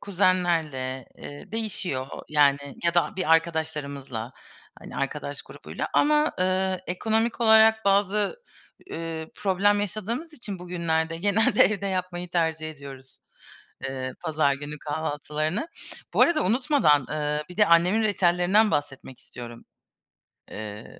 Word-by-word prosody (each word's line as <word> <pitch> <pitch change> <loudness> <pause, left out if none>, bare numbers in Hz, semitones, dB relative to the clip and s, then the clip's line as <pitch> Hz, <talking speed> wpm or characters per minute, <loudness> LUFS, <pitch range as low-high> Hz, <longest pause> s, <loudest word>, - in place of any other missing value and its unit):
kuzenlerle, 165 -9 0
eee, 145 +7 -10
değişiyor, 190 -12 -1 0.2
yani, 145 -2 +4 0.3
ya 170 0 +2
da 175 +3 +1
bir 185 -4 -1
arkadaşlarımızla, 145 -7 -1 0.5
hani, - - -10
arkadaş 140 0 -4
grubuyla. - - -7
Ama, 300 +1 +3
ııı, 185 0 +1
ekonomik 220 +6 -1
olarak 220 -1 +6
bazı, 200 - +1 0.5
ııı, 165 -1 -5
problem 205 +1 +2
yaşadığımız 220 - -4
için 215 -9 -6
bugünlerde 165 -2 -1
genelde 205 +4 +3
evde 200 0 0
yapmayı 180 -2 -3
tercih 160 -2 -1
ediyoruz, 135 -3 -11 0.7
eee, 130 -1 -4
pazar 155 -4 +1
günü 145 +2 -7
kahvaltılarını. 155 - -3 0.5
Bu - - +5
arada 340 -2 +3
unutmadan, 220 - +3
eee, 150 0 -1
bir 180 - -10
de 210 -1 +5
annemin 180 +6 +4
reçellerinden 190 +1 +3
bahsetmek 135 -3 -3
istiyorum. 120 -2 -9 0.9
Eee 105 0 -8
170 Hz, 115 wpm, -25 LUFS, 145-205 Hz, 0.9 s, olarak